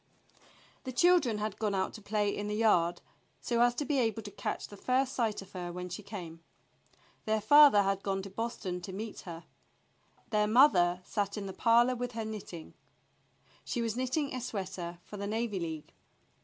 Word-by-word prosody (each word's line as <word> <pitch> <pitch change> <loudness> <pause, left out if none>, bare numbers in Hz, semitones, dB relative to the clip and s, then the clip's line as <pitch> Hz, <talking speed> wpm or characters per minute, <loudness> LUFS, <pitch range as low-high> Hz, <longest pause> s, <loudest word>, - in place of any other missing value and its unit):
The 260 - -5
children 295 -5 +4
had 210 -1 -4
gone 210 -2 0
out 190 0 -1
to 215 - -10
play 205 0 0
in 205 - -4
the 210 - -2
yard, 180 -6 +2 0.4
so 235 -1 0
as 240 0 +4
to 290 - -2
be 275 0 +1
able 225 -2 0
to 205 - -8
catch 200 - -4
the 205 - -11
first 260 +5 0
sight 220 -5 -1
of 195 - -18
her 175 -2 -5
when 180 +1 -6
she 180 +4 -6
came. 180 -5 -8 0.9
Their 220 0 +1
father 280 -1 +7
had 195 0 0
gone 195 -1 -2
to 195 - -7
Boston 195 -4 -4
to 190 - -7
meet 210 +3 -6
her. 165 0 -8 0.9
Their 210 -1 +2
mother 185 -8 +5
sat 200 0 -2
in 205 - -4
the 190 - -6
parlor 240 +3 +4
with 245 0 -4
her 225 -1 -3
knitting. 200 -6 -8 0.9
She 245 - -3
was 225 -1 -2
knitting 260 +3 -1
a 255 - -3
sweater 185 -6 -5
for 205 - -10
the 200 0 -4
Navy 220 -2 -2
League. 160 -3 -6
210 Hz, 190 wpm, -31 LUFS, 190-235 Hz, 0.9 s, father